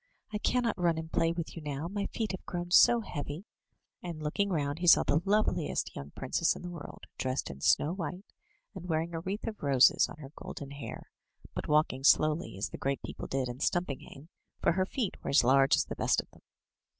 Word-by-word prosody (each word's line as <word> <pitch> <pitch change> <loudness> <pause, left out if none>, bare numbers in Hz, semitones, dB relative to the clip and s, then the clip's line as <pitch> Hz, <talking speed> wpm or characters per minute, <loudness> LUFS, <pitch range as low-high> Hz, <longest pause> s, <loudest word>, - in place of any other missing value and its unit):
I 210 - -1
cannot 235 -3 +1
run 170 -2 +2
and 160 0 -6
play 165 - +2
with 170 -1 -5
you 165 - -7
now, 145 +1 -4
my 200 +2 -3
feet 220 -2 -3
have 190 - -6
grown 175 0 -4
so 235 +5 +7
heavy;'* 145 0 -6 0.6
and 170 -3 -6
looking 200 +7 0
round 145 -3 -1
he 175 - -1
saw - - +8
the 150 +3 +2
loveliest 195 -5 0
young 70 +1 -7
princess 135 +5 +1
in - - -9
the 180 - -5
world, 170 -4 -9 0.2
dressed 130 - -2
in 70 -1 -11
snow 90 - +3
white, 180 +2 -5 0.5
and 180 -2 -8
wearing 165 +1 -1
a 165 - -2
wreath 195 +5 -4
of 215 - -5
roses 135 -3 +5
on - - -10
her 140 -3 -10
golden 140 -1 -8
hair; 140 0 -8 0.4
but - - -4
walking 150 -3 +2
slowly, 155 - +3
as 100 - -2
the - - -8
great 135 0 -2
people - - -6
did 135 -1 -1
in 120 +1 -6
Stumpinghame, 150 -2 -3 0.3
for - - +3
her 185 +2 0
feet 230 -4 -2
were - - -3
as 140 - +5
large 135 +2 +5
as - - +1
the - - -6
best - - +2
of - - -6
them. - - -20
160 Hz, 215 wpm, -30 LUFS, 140-180 Hz, 0.6 s, saw